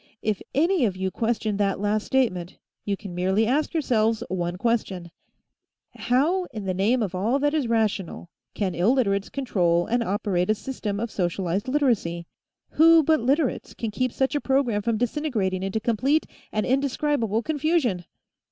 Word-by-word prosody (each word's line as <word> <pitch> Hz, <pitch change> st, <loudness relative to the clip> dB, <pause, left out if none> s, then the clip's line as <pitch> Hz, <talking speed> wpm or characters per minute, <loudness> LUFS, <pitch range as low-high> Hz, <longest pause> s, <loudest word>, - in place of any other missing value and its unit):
If 215 Hz, -2 st, -1 dB
any 335 Hz, +2 st, +3 dB
of 190 Hz, -4 st, -2 dB
you 190 Hz, 0 st, -2 dB
question 220 Hz, -2 st, -1 dB
that 200 Hz, -2 st, 0 dB
last 210 Hz, +1 st, 0 dB
statement, 185 Hz, -10 st, 0 dB, 0.3 s
you 200 Hz, -1 st, -1 dB
can 195 Hz, -3 st, -9 dB
merely 190 Hz, +5 st, +1 dB
ask 285 Hz, +6 st, +1 dB
yourselves 230 Hz, -8 st, +1 dB
one 175 Hz, -1 st, -2 dB
question: 195 Hz, -6 st, -1 dB, 0.8 s
How, 315 Hz, +10 st, +1 dB
in 215 Hz, -10 st, -8 dB
the 185 Hz, -, -1 dB
name 220 Hz, +6 st, +2 dB
of 195 Hz, -3 st, -3 dB
all 210 Hz, +8 st, +1 dB
that 290 Hz, +1 st, +1 dB
is 300 Hz, -6 st, 0 dB
rational, 210 Hz, -6 st, -1 dB, 0.2 s
can 190 Hz, -4 st, -1 dB
Illiterates 200 Hz, 0 st, +1 dB
control 175 Hz, -10 st, +1 dB
and 240 Hz, +1 st, 0 dB
operate 195 Hz, -4 st, -1 dB
a 215 Hz, -, +4 dB
system 210 Hz, -3 st, -4 dB
of 230 Hz, 0 st, -3 dB
socialized 185 Hz, +3 st, -1 dB
Literacy? 235 Hz, -, 0 dB, 0.5 s
Who 330 Hz, 0 st, +6 dB
but 315 Hz, +1 st, +3 dB
Literates 270 Hz, +3 st, 0 dB
can 225 Hz, -2 st, -4 dB
keep 255 Hz, +4 st, -1 dB
such 265 Hz, +4 st, 0 dB
a 290 Hz, -, 0 dB
program 265 Hz, -6 st, +1 dB
from 230 Hz, +1 st, 0 dB
disintegrating 225 Hz, -7 st, -1 dB
into 195 Hz, +3 st, -2 dB
complete 255 Hz, +8 st, +1 dB, 0.3 s
and 215 Hz, -, -1 dB
indescribable 265 Hz, -4 st, 0 dB
confusion? 295 Hz, -, 0 dB
220 Hz, 160 wpm, -25 LUFS, 195-265 Hz, 0.8 s, Who